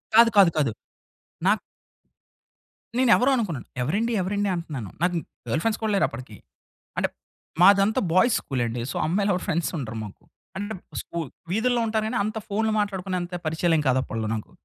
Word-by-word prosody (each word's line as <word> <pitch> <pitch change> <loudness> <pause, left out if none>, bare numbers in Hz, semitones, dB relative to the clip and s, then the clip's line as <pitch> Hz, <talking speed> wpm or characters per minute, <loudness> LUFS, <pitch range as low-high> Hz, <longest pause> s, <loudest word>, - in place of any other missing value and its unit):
కాదు. 230 +1 +8
కాదు. 195 -4 +8
కాదు. 145 -6 +2 0.7
నాక్ - - +4 1.4
నేను 255 -1 +3
ఎవరో 260 +3 +3
అనుకున్నాను. 185 - -2
ఎవరండి? 205 - 0
ఎవరండి? 200 +2 0
అంటన్నాను. 145 - -5
నాకు 175 +1 +2
ఇంక్ 165 - -5 0.2
గర్ల్ 145 +8 +1
ఫ్రెండ్స్ 225 -1 0
కూడా 220 - +1
లేరు 195 - +4
అప్పటికి. 115 -3 -9 0.6
అంటే, - - +2 0.5
మాదంతా 200 +3 +6
బాయ్స్ 215 +6 +4
స్కూల్ 130 -3 -2
అండి. 115 +1 -3
సో, - - -7
అమ్మాయిలు 200 +5 +1
ఎవరు 180 - -2
ఫ్రెండ్స్ 170 +1 0
ఉండరు 115 -6 -5
మాకు. 100 - -12 0.3
అంటే 205 +2 -3 0.3
స్కూ 170 - -6 0.3
వీధుల్లో 240 +4 +2
ఉంటారు 220 0 0
కానీ, 245 +3 -1
అంత 215 +1 -3
ఫోన్‌లు 220 +2 +1
మాట్లాడుకునే 190 -2 -1
అంత 175 0 -5
పరిచయాలేం 160 0 +2
కాదు 130 0 +3
అప్పట్లో 110 -3 -3
నాకు. 110 - -7
185 Hz, 170 wpm, -25 LUFS, 150-215 Hz, 1.4 s, కాదు